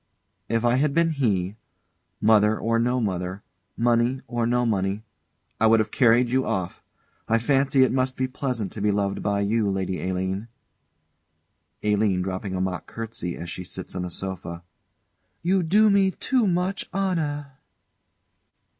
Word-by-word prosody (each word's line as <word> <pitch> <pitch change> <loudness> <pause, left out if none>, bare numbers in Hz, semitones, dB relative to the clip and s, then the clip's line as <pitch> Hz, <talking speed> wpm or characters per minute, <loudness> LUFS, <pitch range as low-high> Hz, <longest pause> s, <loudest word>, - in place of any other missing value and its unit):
_] - - -49 0.5
If 115 +1 +1
I 120 +1 +3
had 140 +1 +1
been 165 0 +3
he, 105 - 0 0.6
mother 105 0 +4
or 115 0 +1
no 125 +2 +1
mother, 95 -2 -3 0.3
money 120 +2 +2
or 120 -1 -1
no 125 +1 +2
money, 100 -1 0 0.6
I 115 - +5
would 110 0 +5
have 110 - -1
carried 120 0 +4
you 130 +2 +2
off. 90 -7 -3 0.5
I 115 - +3
fancy 135 +2 +3
it 130 - +2
must 130 0 0
be 130 - 0
pleasant 125 -5 -3
to 105 - -7
be 105 - +2
loved 100 -1 0
by 100 -1 0
you, 105 +1 +1
Lady 95 -1 -2
Aline. 95 +3 -2 1.4
ALINE. 105 -3 +2
[Dropping 95 +1 -4
a 90 - -1
mock 95 -2 -3
curtsey, 110 -6 -5
as 85 -1 -6
she 90 - -6
sits 95 +1 -7
on 90 - -3
the 90 - -3
sofa.] 85 -1 -6 0.8
You 185 +2 +2
do 205 +6 +4
me 195 -1 +4
too 245 +4 0
much 185 +2 -1
honour. 160 -7 -1
115 Hz, 160 wpm, -25 LUFS, 95-130 Hz, 1.4 s, I